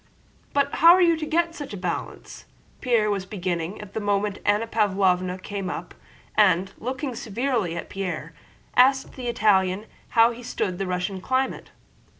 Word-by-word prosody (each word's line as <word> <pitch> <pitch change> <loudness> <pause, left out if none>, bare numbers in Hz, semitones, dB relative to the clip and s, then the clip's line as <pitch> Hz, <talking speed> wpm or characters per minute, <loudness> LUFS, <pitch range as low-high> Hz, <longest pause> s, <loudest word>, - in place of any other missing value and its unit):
"But 280 0 +1
how 335 +1 +9
are 370 - +3
you 335 -1 +4
to 310 -1 -4
get 335 +1 +1
that 280 - -7
balance?" 180 -2 -5 0.4
Pierre 230 -5 +2
was 195 -2 -2
beginning. 180 -2 -3
At 210 -1 -10
that - - -2
moment 205 -1 0
Anna 205 +2 +2
Pávlovna 190 -4 +1
came 200 -2 -4
up - - -6 0.4
and, 190 +3 +3
looking 260 +3 -3
severely 230 -5 -2
at - - -5
Pierre, 180 -4 -5 0.4
asked 265 +2 +4
the 255 -2 -6
Italian 200 -3 +2 0.3
how 230 +1 +7
he 240 +1 -9
stood 195 -6 -3
Russian 185 0 -2
climate. 260 +5 -1
210 Hz, 150 wpm, -24 LUFS, 185-255 Hz, 0.4 s, how